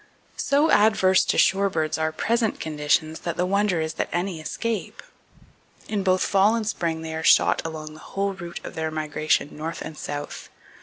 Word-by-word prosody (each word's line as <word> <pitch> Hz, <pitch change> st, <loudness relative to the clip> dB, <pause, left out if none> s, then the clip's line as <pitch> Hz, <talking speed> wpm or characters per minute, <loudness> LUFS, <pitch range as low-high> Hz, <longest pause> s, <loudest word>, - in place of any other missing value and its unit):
So 290 Hz, +3 st, +2 dB
adverse 190 Hz, -3 st, +4 dB
to -, -, 0 dB
shorebirds 190 Hz, -6 st, +2 dB
are 160 Hz, 0 st, 0 dB
present 225 Hz, +7 st, 0 dB
conditions 155 Hz, +1 st, 0 dB
that 170 Hz, -1 st, -4 dB
the 180 Hz, -, +1 dB
wonder 200 Hz, -2 st, +1 dB
is 160 Hz, 0 st, -2 dB
that -, -, -3 dB
any 175 Hz, -1 st, -2 dB
escape. 225 Hz, +7 st, -4 dB, 0.8 s
In 210 Hz, -2 st, -1 dB
both 185 Hz, -1 st, +2 dB
fall 200 Hz, +3 st, +3 dB
and 225 Hz, -2 st, -2 dB
spring 165 Hz, -6 st, -2 dB
they 160 Hz, 0 st, -5 dB
are 160 Hz, -, -3 dB
shot -, -, +4 dB
along 155 Hz, -1 st, -6 dB
the 155 Hz, -, -13 dB
whole 195 Hz, +4 st, -3 dB
route 175 Hz, -2 st, -8 dB
of -, -, -7 dB
their 160 Hz, 0 st, -2 dB
migration 155 Hz, -1 st, -1 dB
north 160 Hz, +2 st, -5 dB
and 155 Hz, -, -7 dB
south. 145 Hz, -1 st, -6 dB
170 Hz, 175 wpm, -24 LUFS, 160-200 Hz, 0.8 s, adverse